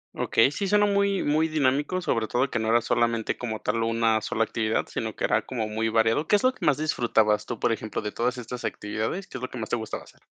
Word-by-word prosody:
Okey, 115 +4 +3
sí, 195 +7 -2
suena 205 +1 +4
muy 200 -1 +1
muy 155 +2 +2
dinámico, 150 +3 +1
sobre 115 -11 -1
todo 125 +5 +1
que 115 - 0
no 110 - -2
era 120 +1 +4
solamente 115 -1 0
como 110 -3 -5
tal 115 +1 -1
una 115 -1 +2
sola 115 +1 0
actividad, 110 0 -1
sino 110 -2 -4
que - - -6
era 105 +1 +2
como 115 -3 -3
muy 110 +1 -1
variado. 115 +6 +2
¿Qué - - +4
es 205 - +1
lo 255 0 +4
que - - -12
más 150 -4 +3
disfrutabas 115 -8 +1
tú? 120 - -5
Por - - +1
ejemplo, 110 -1 -3
de 105 - -3
todas 125 +3 -1
estas 125 +1 -6
actividades, 110 - -3
¿qué 130 - -7
es - - -14
lo 130 - -4
que - - -8
más 110 -2 -5
te - - +1
gustaba 110 -2 -5
hacer? - - -20
120 Hz, 255 wpm, -26 LUFS, 110-150 Hz, -, suena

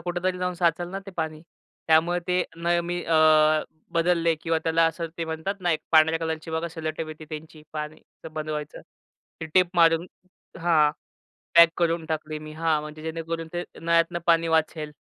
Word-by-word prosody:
कुठेतरी 180 +1 -2
जाऊन 180 0 -1
साचलं 175 0 0
ना 195 - -4
ते - - -7
पाणी, 155 -1 -3 0.5
त्यामुळे 165 +2 +4
ते 180 0 +2
नळ 170 +1 +1
मी 175 0 -3
अ, 165 -1 +2 0.8
बदलले 170 -1 +2
किंवा 165 -1 +1
त्याला 165 0 +3
असं 165 +1 -2
ते 165 - -1
म्हणतात 160 +5 -3
ना 175 -1 +1
एक 155 - -1
पांढऱ्या 160 +1 +5
कलरची 160 0 -3
बघा 160 +1 -2
सेलोटेप 160 -1 -5
येते 155 0 -9
त्यांची, 155 0 -9
पाणी 155 0 -5 0.3
बंद 155 0 -4
व्हायचं, 150 -1 -5 0.6
ते 160 - -4
टेप 180 -2 +4
मारून 165 0 +4 0.5
हां, 165 -3 +4 0.6
पॅक 170 0 +9
करून 170 -1 0
टाकली 155 -1 -3
मी 155 0 -9
हां, 160 -1 +1
म्हणजे 150 +1 -9
जेणेकरून 165 0 -4
ते 175 0 -3 0.2
नळ्यातनं 170 +1 +2
पाणी 165 -1 +4
वाचेल 155 -1 0
165 Hz, 170 wpm, -25 LUFS, 155-170 Hz, 0.8 s, पॅक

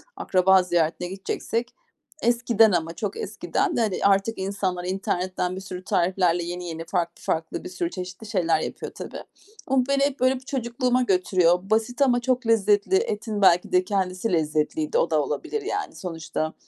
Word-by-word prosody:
akraba 190 0 +4
ziyaretine 175 0 0
gideceksek 210 +5 -3 0.5
eskiden 235 -2 +4
ama 165 -2 0
çok 205 +1 -4
eskiden 395 -4 -2
de, 235 - +2
hani, 210 -4 0
artık 200 +3 +3
insanlar 190 -2 -2
internetten 185 -1 -2
bir 190 - -6
sürü 185 -1 -7
tariflerle 175 -1 +1
yeni 175 +1 -5
yeni 165 0 -6
farklı 170 0 -2
farklı 160 0 -2
bir 360 - -6
sürü 350 -1 -2
çeşitli 185 - -7
şeyler 180 -6 +1
yapıyor - - -5
tabii. - - -7 0.4
Ama 265 -1 +3
beni 275 0 +3
hep 280 -1 0
böyle 255 +1 +3
bir - - -6
çocukluğuma 250 -1 0
götürüyor. 180 -5 +3
Basit 225 +4 0
ama 250 -3 +4
çok 250 0 0
lezzetli. 210 - +3
Etin 215 - -1
belki 180 -2 +4
de 180 0 +4
kendisi 185 +1 -1
lezzetliydi. 160 - 0
O - - +2
da - - +2
olabilir 440 - -3
yani. 415 +1 -3
Sonuçta 160 -2 -4
195 Hz, 165 wpm, -24 LUFS, 180-240 Hz, 0.5 s, akraba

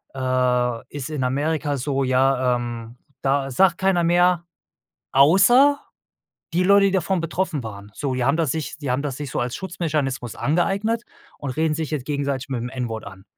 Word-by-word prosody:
äh, 125 -2 0
ist 140 -1 -4
in 150 -4 -3
Amerika 145 +2 -1
so 135 +1 -1
ja, 130 -1 +2
ähm, 120 0 -6 0.2
das 135 -1 0
sagt 185 -3 +4
keiner 190 -2 +2
mehr, 175 0 +3 0.7
außer 195 - +5 0.7
die 180 +2 +2
Leute, 200 +1 +5
die - - 0
davon 190 -1 0
betroffen 165 -3 -2
waren. 100 -2 -9
So 140 -3 -2
die 125 -1 0
haben 140 +5 +2
das 160 -5 +1
sich 155 -1 -4
die 140 -4 -2
haben 130 +2 0
das 140 -3 -3
sich 145 -3 -6
so - - -2
als 120 +1 -2
Schutzmechanismus 150 - -3
angeeignet 200 +9 0 0.4
und 140 - -4
reden 160 -1 +2
sich 160 -1 -4
jetzt 140 -5 -3
gegenseitig 140 -2 -2
mit 130 - -2
dem 120 - -4
N-Wort 120 -4 -4
an. 95 0 -11
140 Hz, 180 wpm, -22 LUFS, 125-170 Hz, 0.7 s, außer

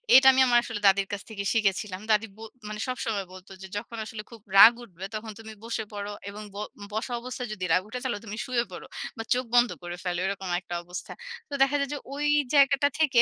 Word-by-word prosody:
এটা 265 +1 +9
আমি 265 0 +4
আমার 240 -1 +5
আসলে 225 -3 -4
দাদীর 195 0 +4
কাছ 200 - -3
থেকে 205 -2 -4
শিখেছিলাম। 200 -3 0
দাদী 215 +1 +4
ব - - -18 0.3
মানে 210 0 -5
সবসময় 225 -5 -2
বলত 185 +1 -12
যে, 190 - -7
"যখন 230 +3 -6
আসলে 215 -1 -6
খুব 230 -2 -12 0.2
রাগ 225 +4 +11
উঠবে 190 -5 -9
তখন 220 +1 -5
তুমি 220 -1 -9
বসে 230 -1 -3
পড়ো, 205 0 -4 0.2
এবং 210 +1 -8
ব - - -7 0.4
বসা 220 +3 -2
অবস্থায় 250 0 -5
যদি 185 -3 -4
রাগ 180 - +4
উঠে 250 +4 -5
তাহলে 240 -6 -2
তুমি 210 0 -6
শুয়ে 250 -3 +1
পড়ো। - - -8 0.3
বা 225 - -3
চোখ 250 +1 -1
বন্ধ 240 0 +6
করে 175 0 -5
ফেলো।" 175 -2 -1
এরকম 195 -1 -3
একটা 180 -1 -9
অবস্থা। 175 +1 -7 0.4
তো - - -8
দেখা 275 +1 +4
যায়, 280 -1 -1
যে - - -2 0.2
ওই 295 +1 -1 0.3
জায়গাটা 280 0 +5
থেকে 275 -6 +5
220 Hz, 225 wpm, -27 LUFS, 200-250 Hz, 0.4 s, রাগ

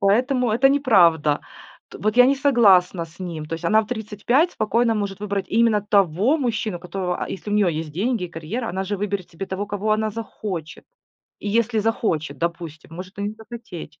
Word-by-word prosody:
Поэтому 245 +5 +2
это 240 +5 +4
неправда. 175 - +4 0.5
Т - - -11
вот 215 +2 -1
я 250 - +8
не 275 - +4
согласна 195 - +4
с 160 +2 -17
ним. 165 -4 -5
То 165 - -4
есть 165 - -8
она 215 0 +4
в 215 - -11
35 240 - 0
спокойно 230 +2 +1
может 200 -2 -3
выбрать 200 -1 -2
именно 225 -1 +3
того 200 - +2
мужчину, 220 - -2
которого, 180 0 -4
а, - - -9
если 200 +2 -6
у - - -1
нее 190 -6 +2
есть 155 -1 -5
деньги, 215 - -1
карьера, 175 +9 -5
она 190 +2 -3
же 205 +2 -2
выберет 200 -2 -3
себе 185 +3 -6
того, 195 +2 -4
кого 205 +1 -1
она 215 0 0
захочет. 200 -7 -6 0.6
И 205 - -4
если 225 +1 +1
захочет, 160 - -1
допустим, 165 -1 -5
может 185 +3 -9
и - - -3
не 205 +1 -3
захотеть. 220 -9 -10
205 Hz, 195 wpm, -22 LUFS, 175-225 Hz, 0.6 s, я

